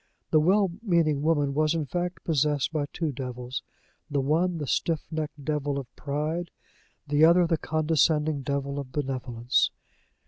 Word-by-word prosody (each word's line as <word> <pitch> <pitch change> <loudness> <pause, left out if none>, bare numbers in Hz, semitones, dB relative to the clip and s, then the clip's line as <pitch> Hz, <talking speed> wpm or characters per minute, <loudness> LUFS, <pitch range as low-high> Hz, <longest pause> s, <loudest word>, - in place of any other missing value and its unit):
The 155 - +6
well 190 +4 +3
meaning 165 -9 +2
woman 145 -3 +2
was 155 +2 +2
in 160 -2 -1
fact 175 +6 -3
possessed 150 -1 +1
by 145 -2 0
two 160 -4 -2
devils 125 -1 -5 0.5
the 145 -1 0
one 165 +6 +1
the 150 - -3
stiff 160 +4 0
necked 155 -2 -4
devil 145 -2 -1
of 130 -3 -7
pride, 155 +4 -2 0.6
the 145 +1 +2
other 170 +2 +7
the 165 -1 +1
condescending 155 -1 +1
devil 140 0 -2
of 135 -2 -7
benevolence. 130 -3 0
150 Hz, 150 wpm, -27 LUFS, 140-160 Hz, 0.6 s, other